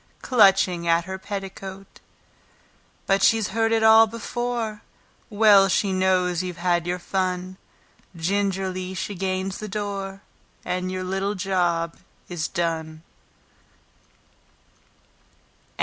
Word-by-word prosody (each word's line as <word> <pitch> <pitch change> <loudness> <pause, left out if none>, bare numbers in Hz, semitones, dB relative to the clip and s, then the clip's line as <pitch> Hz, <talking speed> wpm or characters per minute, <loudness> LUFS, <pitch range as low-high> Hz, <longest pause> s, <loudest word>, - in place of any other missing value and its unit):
Clutching 195 -7 +4
at 170 0 +3
her 190 0 -6
petticoat; 195 -1 -8 1.1
But 195 0 +2
she's 225 -2 +3
heard 225 +1 0
it 225 -1 +2
all 220 0 +7
before, 230 -1 -4 0.5
Well 205 -2 +6
she 195 +1 +1
knows 185 -2 +1
you've 180 -2 -6
had 175 -1 0
your 180 +1 -1
fun, 185 0 -3 0.6
Gingerly 190 +1 -2
she 205 - -4
gains 190 0 -3
the 215 - -5
door, 195 -1 -5 0.4
And 180 +1 -2
your 185 0 -3
little 195 +2 -2
job 175 -3 -1 0.3
is 170 -3 -3
done. 160 -2 -3
190 Hz, 105 wpm, -24 LUFS, 180-205 Hz, 1.1 s, all